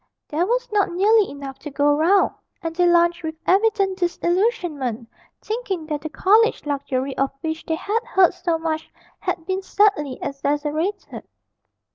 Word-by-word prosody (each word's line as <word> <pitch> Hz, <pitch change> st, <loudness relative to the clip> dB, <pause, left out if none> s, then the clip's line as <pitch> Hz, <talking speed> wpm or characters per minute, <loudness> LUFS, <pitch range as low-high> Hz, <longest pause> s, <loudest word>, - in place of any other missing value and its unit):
There 330 Hz, +5 st, 0 dB
was -, -, 0 dB
not 410 Hz, -2 st, +2 dB
nearly 410 Hz, +4 st, +3 dB
enough 275 Hz, -1 st, -8 dB
to 300 Hz, -, -7 dB
go 290 Hz, +1 st, +2 dB
round, 355 Hz, +6 st, +3 dB, 0.3 s
and 330 Hz, 0 st, -4 dB
they 355 Hz, 0 st, +3 dB
lunched 345 Hz, 0 st, +3 dB
with 320 Hz, -1 st, -4 dB
evident 395 Hz, -1 st, +2 dB
disillusionment, 345 Hz, -, -1 dB, 0.4 s
thinking 425 Hz, -7 st, -3 dB
that 300 Hz, -2 st, -3 dB
the 315 Hz, -, -5 dB
college 430 Hz, +7 st, +3 dB
luxury 275 Hz, -2 st, -2 dB
of 275 Hz, 0 st, +2 dB
which 320 Hz, 0 st, -3 dB
they 320 Hz, -, 0 dB
had 425 Hz, +7 st, -2 dB
heard 380 Hz, -5 st, +3 dB
so 350 Hz, -2 st, -1 dB
much 320 Hz, -1 st, -3 dB, 0.3 s
had 330 Hz, -, -3 dB
been 375 Hz, +1 st, -2 dB
sadly 380 Hz, -9 st, +1 dB
exaggerated. 295 Hz, +7 st, -3 dB
340 Hz, 150 wpm, -22 LUFS, 295-390 Hz, 0.4 s, nearly